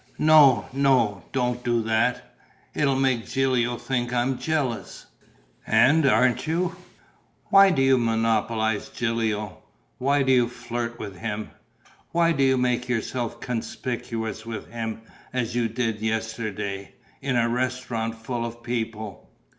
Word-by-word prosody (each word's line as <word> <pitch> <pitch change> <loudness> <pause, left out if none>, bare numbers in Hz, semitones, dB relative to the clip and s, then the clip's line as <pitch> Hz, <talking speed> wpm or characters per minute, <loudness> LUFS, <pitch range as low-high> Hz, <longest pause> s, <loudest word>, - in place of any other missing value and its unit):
"No, 150 -7 +6
no, 130 -8 +2
don't 125 -1 -1
do 120 -1 +1
that: 110 +3 0 0.4
it'll 140 -2 +1
make 130 -4 +1
Gilio 125 -3 +1
think 120 -2 -2
I'm 125 +1 0
jealous!" 145 -7 -2 0.6
"And 135 +7 +5
aren't 125 +1 +3
you?" 175 +2 0 0.8
"Why 195 0 +8
do 140 -8 +2
you 135 -1 +4
monopolize 110 -1 0
Gilio? 110 -4 -2 0.4
Why 140 +2 +2
do 130 - +2
you 125 -2 +4
flirt 120 -1 -5
with 100 -5 -7
him? 110 +1 -4 0.6
Why 170 0 +3
do 140 -4 +1
you 130 -1 +4
make 125 0 0
yourself 120 0 -2
conspicuous 115 -2 -4
with 115 -2 -7
him, 110 -1 -5 0.3
as 125 -2 -1
you 120 -1 +2
did 115 -2 -2
yesterday, 110 -3 -3 0.3
in 135 -2 -1
a 120 -1 +3
restaurant 120 -2 -2
full 115 +1 -4
of 120 0 -7
people?" 110 -4 -4
120 Hz, 130 wpm, -25 LUFS, 110-130 Hz, 0.8 s, Why